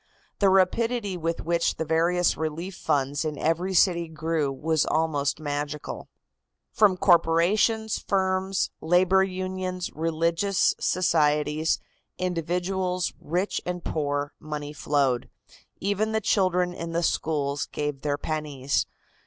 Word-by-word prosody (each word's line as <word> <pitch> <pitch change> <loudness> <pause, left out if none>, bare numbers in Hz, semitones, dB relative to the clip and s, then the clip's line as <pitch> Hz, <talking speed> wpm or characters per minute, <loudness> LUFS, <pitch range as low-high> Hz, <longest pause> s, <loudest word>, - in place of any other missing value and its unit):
The 200 - +5
rapidity 200 +2 +2
with 165 -1 -2
which 170 0 +1
the 160 - -3
various 170 +2 +2
relief 160 +4 -4
funds 145 -4 0
in 155 -2 -3
every 170 +6 0
city 170 -2 +3
grew 160 -2 -1
was 155 +3 0
almost 155 -3 0
magical. 145 0 -4 0.6
From 200 -4 +4
corporations, 190 +6 +3
firms, 190 -1 0
labor 185 +3 +4
unions, 185 -1 -3
religious 165 +4 +1
societies, 150 -3 +2 0.4
individuals, 180 +1 -1
rich 180 +6 -1
and 180 -1 -4
poor, 145 -1 -2
money 150 -1 -6
flowed. 140 -4 0 0.5
Even 205 +3 0
the 220 - +2
children 180 -4 +1
in 165 -1 -6
the 170 +1 0
schools 145 -3 0
gave 145 -2 -4
their 145 -1 -1
pennies. 145 -4 -2
165 Hz, 115 wpm, -26 LUFS, 150-185 Hz, 0.6 s, The